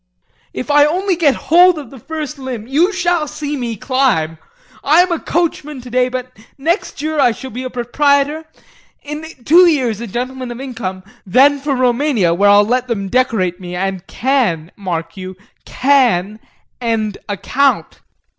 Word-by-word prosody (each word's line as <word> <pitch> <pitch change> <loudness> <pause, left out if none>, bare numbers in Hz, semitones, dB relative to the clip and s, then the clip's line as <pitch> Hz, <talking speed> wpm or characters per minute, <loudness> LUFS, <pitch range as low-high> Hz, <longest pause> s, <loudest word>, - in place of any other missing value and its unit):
If 270 - -4
I 290 0 +6
only 365 +5 +1
get 305 -5 +3 0.2
hold 355 +1 +6
of 280 -6 -8
the 270 - -11
first 300 +2 -6
limb, 255 -5 -6
you 310 - +2
shall 350 -4 0
see 295 0 -4
me 240 -4 -3
climb. 210 - 0 0.4
I'm 345 +5 +4
a 335 - 0
coachman 300 -4 -2
today, 250 0 0
but 255 0 -6 0.2
next 320 0 -2
year 310 0 -1
I 250 -3 +5
shall 265 +3 -9
be 245 +4 -5
a 255 - -4
proprietor, 285 +5 +1 0.6
in 300 +2 -6 0.2
two 350 +4 +7
years 250 - +1
a 235 - -5
gentleman 255 +4 -4
of 240 0 -7
income; 215 -9 -5 0.2
then 275 +9 +4
for 280 0 -1
Roumania 250 - +2
where 200 +4 +3
I'll 205 +1 +6
let 250 +3 0
them 200 -5 -3
decorate 210 -8 0
me 180 -1 -7
and 190 0 -3
can, 220 - 0
mark 165 -3 -5
you, 185 0 -7 0.3
can 235 -7 +2 0.4
end 220 -3 -1
a 205 - -2
count! 275 +7 0
255 Hz, 165 wpm, -17 LUFS, 210-295 Hz, 0.6 s, two